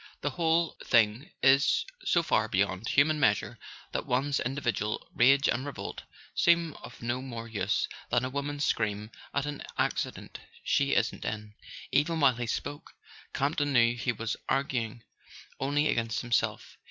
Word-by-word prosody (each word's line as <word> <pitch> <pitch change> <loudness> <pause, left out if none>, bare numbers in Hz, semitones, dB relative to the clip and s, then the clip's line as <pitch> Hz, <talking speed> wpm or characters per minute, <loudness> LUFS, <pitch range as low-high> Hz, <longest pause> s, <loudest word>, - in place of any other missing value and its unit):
The 145 - -1
whole 165 +3 +1
thing 115 - +3
is 135 +2 +5 0.2
so 170 - +2
far 110 -8 +2
beyond 100 +1 0
human 150 +2 +3
measure 105 -8 +1 0.3
that - - -3
one's 135 +3 +1
in¬ 130 +2 -2
dividual 115 -6 -2
rage 135 +3 +5
and 130 - 0
revolt 145 -1 -6 0.3
seem 170 -2 +3
of - - -11
no 120 +2 -1
more 115 -3 -6
use 105 -4 0 0.2
than 120 +1 +2
a - - -2
woman's 145 +1 -2
scream 105 0 -1 0.2
at 140 0 -1
an 145 -1 -5 0.2
accident - - -2 0.2
she - - +2
isn't - - 0
in." 105 -1 -4 0.4
Even 155 +4 +2
while 135 -5 +4
he 120 -1 -3
spoke, 145 +5 -5 0.4
Campton 145 0 0
knew 120 -1 +4
he 120 +1 -1
was 115 -1 -3
argu¬ 135 0 +1
ing 115 -1 -3 0.6
only 145 +3 +1
against 115 -4 0
himself. 120 -2 -1
130 Hz, 155 wpm, -29 LUFS, 115-145 Hz, 0.6 s, is